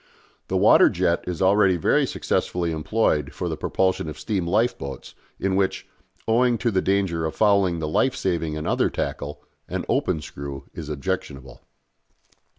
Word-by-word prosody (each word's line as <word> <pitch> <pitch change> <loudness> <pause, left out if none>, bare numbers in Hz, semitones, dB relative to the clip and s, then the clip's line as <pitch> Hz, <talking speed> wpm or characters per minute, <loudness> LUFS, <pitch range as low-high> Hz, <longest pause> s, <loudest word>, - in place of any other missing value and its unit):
The - - 0
water - - +6
jet 85 - 0
is 90 0 -2
already 95 -1 +4
very 80 - +2
successfully 85 -2 -1
employed 75 -3 0
for 90 - -3
the 80 - -2
propulsion 95 +1 0
of 75 - -8
steam 85 +3 -2
lifeboats 85 - -1 0.3
in 95 -1 0
which, 95 0 0 0.4
owing 120 +1 +3
to 120 -1 0
the 95 -2 +1
danger 95 -4 0
of 80 - -3
fouling 100 -5 +3
the 80 -1 -3
life 125 +11 +1
saving 85 -4 -1
and 75 - -5
other - - +1
tackle, 75 0 -4 0.3
an - - -3
open - - 0
screw 70 -2 -7
is 75 -2 -7
objectionable. 70 -3 -4
85 Hz, 155 wpm, -24 LUFS, 75-95 Hz, 0.4 s, water